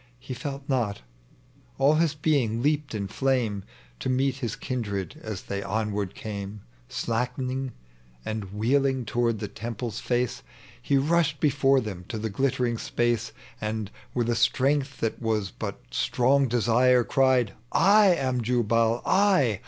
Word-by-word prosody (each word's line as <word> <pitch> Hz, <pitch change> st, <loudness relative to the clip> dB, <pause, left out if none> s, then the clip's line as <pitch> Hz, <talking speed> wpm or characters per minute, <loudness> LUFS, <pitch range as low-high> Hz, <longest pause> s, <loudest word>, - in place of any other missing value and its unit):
He 125 Hz, +1 st, -7 dB
felt 140 Hz, +1 st, -6 dB
not; 115 Hz, -, -1 dB, 0.7 s
all 140 Hz, +3 st, +4 dB
his 160 Hz, -1 st, +2 dB
being 135 Hz, -7 st, +1 dB
leaped 150 Hz, -3 st, 0 dB
iu 100 Hz, -2 st, -2 dB
flame 115 Hz, -2 st, 0 dB, 0.4 s
To -, -, -2 dB
meet 130 Hz, 0 st, +1 dB
his 120 Hz, -5 st, -3 dB
kindred 115 Hz, +1 st, -4 dB
as 110 Hz, -4 st, -5 dB
they 100 Hz, 0 st, -4 dB
onward 105 Hz, -1 st, -2 dB
came 100 Hz, -1 st, -6 dB, 0.3 s
Slackening 125 Hz, +2 st, -2 dB, 0.5 s
and 110 Hz, -2 st, -3 dB
wheeling 130 Hz, +4 st, +1 dB
toward 115 Hz, 0 st, 0 dB
the 105 Hz, -, -4 dB
temple's 115 Hz, +1 st, -5 dB
face 120 Hz, -, -1 dB, 0.4 s
He 140 Hz, -, +2 dB
rushed 150 Hz, 0 st, +2 dB
before 135 Hz, -2 st, +3 dB
them 95 Hz, -6 st, -6 dB
to 115 Hz, -, -3 dB
the 110 Hz, 0 st, -3 dB
glittering 125 Hz, 0 st, 0 dB
apace, 120 Hz, 0 st, 0 dB, 0.3 s
And, 110 Hz, -1 st, -3 dB, 0.2 s
with 120 Hz, -2 st, +1 dB
a 120 Hz, -, +1 dB
strength 135 Hz, +4 st, +1 dB
that 115 Hz, -, -1 dB
was 110 Hz, -4 st, 0 dB
but -, -, -5 dB
strong 135 Hz, +2 st, +2 dB
desire, 120 Hz, +1 st, +4 dB
Cried, 130 Hz, -5 st, +2 dB
*' 120 Hz, -, -34 dB, 0.3 s
I 205 Hz, -, +6 dB
am 130 Hz, -5 st, -1 dB
Jnbal, 115 Hz, 0 st, +1 dB
I 185 Hz, -, +3 dB
120 Hz, 145 wpm, -26 LUFS, 110-135 Hz, 0.7 s, I